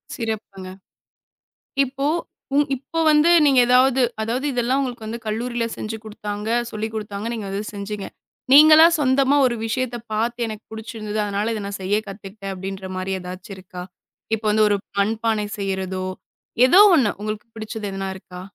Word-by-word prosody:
சிறப்புங்க. 205 -5 -5 1.2
இப்போ 275 +2 -3 0.7
இப்ப 275 +5 -4
வந்து 300 +2 +5 0.2
நீங்க 275 -3 +5
ஏதாவது 255 +1 +4 0.2
அதாவது 240 +5 -2
இதெல்லாம் 250 +2 +1
உங்களுக்குக் 235 -3 -5
கல்லூரியிலே 235 +2 -2
செஞ்சு 220 +1 -5
குடுத்தாங்க, 210 -1 -6 0.2
சொல்லிக் 220 +1 -4
குடுத்தாங்க, 210 0 -4
நீங்க 220 -3 -5
அதைச் 200 +2 -4
செஞ்சீங்க. 200 0 -5 0.5
நீங்கல்லா 310 +3 +9
சொந்தமா 270 0 +3
ஒரு 245 -2 +1
விஷயத்தைப் 240 0 -3
பார்த்து 235 +2 -1
எனக்குப் 215 0 -9
பிடிச்சிருந்தது. 215 -1 -5
அதனால 205 +2 -1
இதை 215 - -4
நான் 200 0 -5
செய்யக் 205 +3 -1
கத்துக்கிட்டேன் 195 0 -7
அப்படின்ற 190 0 -6
மாதிரி 185 +1 -2
ஏதாச்சி 185 +4 -9
இருக்கா? 180 -1 -9 0.5
இப்போ 220 0 -9
வந்து 215 0 +4
ஒரு 205 - +2 0.2
மண்பானை 220 +1 0
செய்யறதோ, 190 -1 -3 0.6
ஏதோ 365 +10 +7
ஒண்ணு. 245 -10 +3
உங்களுக்குப் 215 +2 -5
பிடிச்சது 215 -1 -5
எதுனா 195 0 -4
இருக்கா? 180 -1 -10
215 Hz, 140 wpm, -22 LUFS, 200-240 Hz, 1.2 s, நீங்கல்லா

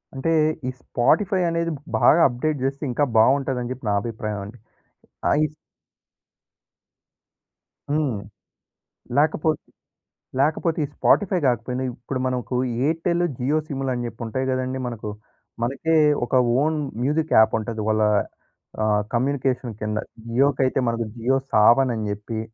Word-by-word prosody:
అంటే 135 +5 -2 0.4
ఈ - - 0
స్పాటిఫై 185 - +1
అనేది 170 0 -1 0.3
బాగా 170 - +6
అప్‌డేట్ 140 +3 -2
చేస్తే 135 +3 -2
ఇంకా 145 +4 +2
బావుంటదని 130 +1 +2
చెప్పి 130 -2 -7
నా 100 - +2
అభిప్రాయమండి. 105 -1 -5 0.7
ఆ! - - +3 0.2
ఈ - - 0 2.4
హ్మ్. 145 -6 0 1.0
లేకపోతే 155 +1 +2 0.8
లేకపోతే 155 +3 +1
ఈ - - -8
స్పాటిఫై 190 -3 +3
గాకపోయిన 125 +1 0
ఇప్పుడు 125 +2 -5
మనకు 125 -1 -2 0.3
ఎయిర్టెల్, 170 +2 +1
జియో 140 +5 +1
సిములని 135 -4 -2
చెప్పి 115 0 -10
ఉంటాయి 130 +4 -2
కదండీ 130 0 -1
మనకు. 110 -3 -5 0.5
మనకే 140 +7 0 0.3
ఒక 120 - -11 0.3
ఓన్ 155 +1 +1 0.3
మ్యూజిక్ 150 +3 0
యాప్ 110 - +6
ఉంటది. 110 0 -4
వాళ్ళ 110 0 +2 0.8
ఆహ్, 105 -1 +2
కమ్యూనికేషన్ 130 -1 0
కింద. 105 0 -2 0.3
జియో‌కైతే 135 +1 +2
మనకు 115 0 -1
జియో 125 +3 +1 0.2
సావన్ 120 +4 +5 0.2
చెప్పి. 105 +2 -5
130 Hz, 115 wpm, -23 LUFS, 115-150 Hz, 2.4 s, బాగా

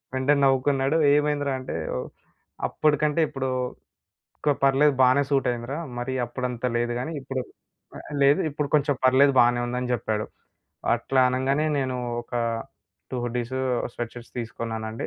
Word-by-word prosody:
వెంటనే 140 +2 +3
నవ్వుకున్నాడు. 135 +2 +2 0.2
ఏమైందిరా 145 -1 +1
అంటే, 130 - -6 0.9
అప్పటికంటే 150 +1 +1
ఇప్పుడు 135 -1 -3 0.9
ఓకే 145 -1 +1
పర్లేదు. 135 +1 +4
బానే 130 +3 +5
సూట్ 135 -2 +2
అయిందిరా. 120 +5 -5 0.2
మరి 130 +2 -3
అప్పుడంత 125 0 -4
లేదు 120 0 0
గానీ, 160 +6 -4
ఇప్పుడు 130 -1 -3 0.6
ఆహ్, - - -11
లేదు 145 +7 +5
ఇప్పుడు 145 0 -2
కొంచెం 145 -1 +1
పర్లేదు, 135 +2 +5
బాగానే 120 0 +3
ఉందని 125 0 -2
జెప్పాడు. 110 -2 -2 0.7
అట్లా 130 +3 +1
అనంగానే 135 +4 +1
నేను 130 -1 -1 0.3
ఒక 120 - -11 0.8
2 130 - -3
హుడ్డీసు, 120 +1 -3 0.4
స్వెట్ 120 -1 -4
షర్ట్స్ 120 -1 -11
తీసుకున్నానండి. 110 -1 -4
130 Hz, 130 wpm, -25 LUFS, 120-140 Hz, 0.9 s, బానే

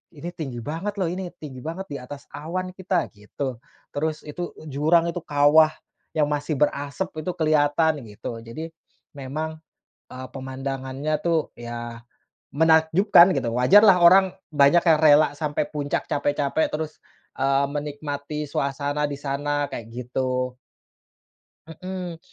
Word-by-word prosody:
ini 155 +4 -6
tinggi 135 -8 -6
banget 165 - -4
lho 190 -4 0
ini 185 +1 -4
tinggi 140 -6 -9
banget 165 +8 -5
di 140 - -4
atas 140 +3 -9
awan 185 +5 -4
kita," 185 -2 -1
gitu. 120 +4 -6 0.3
Terus 155 +1 -2
itu 175 +4 -6 0.2
jurang 165 +4 +3
itu 175 - -4
kawah 150 0 +5 0.4
yang 150 -2 +3
masih 150 +1 -1
berasep 145 +4 -1
itu 155 +4 -2
keliatan 155 0 +2
gitu, 110 +2 -7
jadi 135 +9 -7 0.4
memang, 155 +3 -5 0.5
eee, 130 0 -7
pemandangannya 135 +2 -3
tuh 165 -2 +1
ya 120 0 -7 0.5
menakjubkan 160 +4 +5
gitu. - - -1
Wajarlah 190 - +6
orang 185 +2 +7 0.2
banyak 145 +3 +5
yang 160 -3 +5
rela 155 -1 +6
sampai 150 -1 -1
puncak, 145 -2 -2
capek-capek, 145 +1 +1
terus, 155 0 -4 0.4
eee, 135 +1 +3
menikmati 145 0 -4
suasana 145 +2 -1
di 145 - -4
sana 145 +1 -1
kayak 115 - -6
gitu. 125 +1 -2 1.1
Mhm. 180 +1 -6
150 Hz, 130 wpm, -24 LUFS, 140-160 Hz, 1.1 s, orang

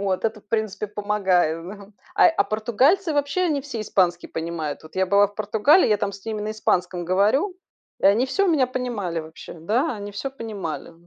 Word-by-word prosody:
Вот 195 0 -1
это, 220 -1 -1
в - - -36
принципе, 215 -1 -2
помогает, 190 -6 0
да. 200 0 -10 0.2
А - - +6
а 325 - +1
португальцы 260 - +2
вообще 290 +5 0
они 310 -6 +1
все 265 -6 -5
испанский 180 -4 +1
понимают. 160 -3 -4
Вот 155 - -15
я 190 0 +2
была 200 +2 +5
в 205 - -18
Португалии, 220 - +3
я 210 - +3
там 200 -1 -2
с 195 +2 -12
ними 220 -1 -3
на 210 - -3
испанском 180 -4 -1
говорю 215 - +2 0.4
и - - -6
они 210 +6 +4
всё 395 +9 +1
меня 305 -8 +3
понимали 235 -10 -3
вообще. 160 +1 -11
Да, 235 - 0
они 205 0 -7
всё 235 +7 -4
понимали. 205 - -6
210 Hz, 195 wpm, -23 LUFS, 185-250 Hz, 0.4 s, А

